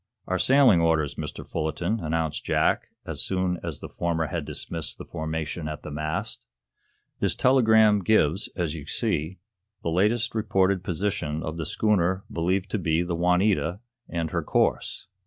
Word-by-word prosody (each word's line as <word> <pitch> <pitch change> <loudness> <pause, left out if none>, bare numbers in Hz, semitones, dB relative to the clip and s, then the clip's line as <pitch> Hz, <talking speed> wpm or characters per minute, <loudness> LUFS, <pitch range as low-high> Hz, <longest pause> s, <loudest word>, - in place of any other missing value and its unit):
"Our 95 0 -1
sailing 130 -7 +5
orders, 80 -3 +2
Mr. - - -6
Fullerton," 85 +7 -1
announced 80 -2 -2
Jack, - - +1 0.2
as - - -4
soon 90 -2 -1
as 85 -4 -5
the - - -6
former 85 -1 -1
had 80 0 -3
dismissed 80 0 -5
the - - -8
formation 80 0 -4
at 75 -1 -6
the 75 - -7
mast. 75 -4 -3 0.7
"This - - +1
telegram 110 -5 +5
gives, 95 -3 +3
as 85 -4 -1
you 75 -2 -8
see, 80 +6 -1 0.5
the 85 - -1
latest 105 +7 +2
reported 95 -4 +1
position 85 -4 -2
of 80 +1 -4
the 80 -2 -3
schooner 95 -1 +1
believed 90 +3 0
to 110 - 0
be 80 -1 +1
the 85 -1 -2
'Juanita,' 90 +1 +2 0.3
and 85 -2 -2
her - - 0
course. - - 0
85 Hz, 155 wpm, -26 LUFS, 80-95 Hz, 0.7 s, sailing